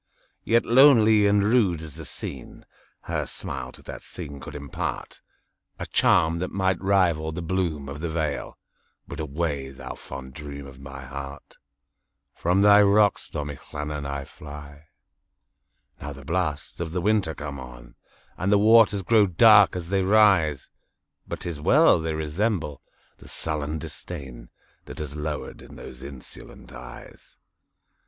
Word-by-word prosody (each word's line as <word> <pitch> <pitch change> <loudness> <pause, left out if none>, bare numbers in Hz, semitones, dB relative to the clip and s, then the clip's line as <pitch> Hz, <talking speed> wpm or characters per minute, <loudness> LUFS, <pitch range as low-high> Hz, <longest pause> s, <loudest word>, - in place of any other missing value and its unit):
Yet 115 +1 +2
lonely 115 -5 +6
and 100 0 +3
rude 105 -7 +3
as 80 -3 -9
the - - -8
scene, 65 -3 -6 0.4
Her - - -3
smile 65 -2 -5
to - - -15
that - - -8
scene 70 -1 -9
could 70 +2 -9
impartA 70 -2 -5 0.7
charm 80 +1 +3
that 90 - -2
might 95 -2 0
rival 90 -5 +2
the 85 +2 -5
bloom 85 -5 -2
of 70 +2 -7
the 85 - -2
vale,—But 75 -1 -6
away, 75 -2 -3
thou 65 - -8
fond 65 -1 -9
dream 70 0 -8
of 65 -1 -13
my 70 0 -9
heart! 70 +1 -9 0.8
From 90 +4 +1
thy 105 0 +7
rocks, 100 0 +3
stormy 75 -1 -5
Llannon, 75 -1 -6
I 70 0 -4
fly. 75 0 -11 1.2
Now 75 0 -6
the 70 -1 -12
blasts 80 -3 -2
of 85 -1 -4
the 90 - -1
winter 100 -5 +1
come 70 -2 -6
on, - - -11 0.5
And 95 +4 0
the 105 - +6
waters 110 -1 +5
grow 105 +1 +4
dark 100 +2 +6
as 85 -2 -5
they 95 0 +1
rise! 95 -8 +3 0.6
But - - -6
't - - -4
is 75 -3 -6
well!—they 80 +1 +4
resemble 80 - -2 0.4
the - - -15
sullen 75 -1 -3
disdainThat 65 -7 -9
has 75 -1 -5
lowered 75 0 -5
in - - -13
those 65 - -11
insolent 70 -1 -11
eyes. 60 0 -12
80 Hz, 145 wpm, -25 LUFS, 70-95 Hz, 1.2 s, thy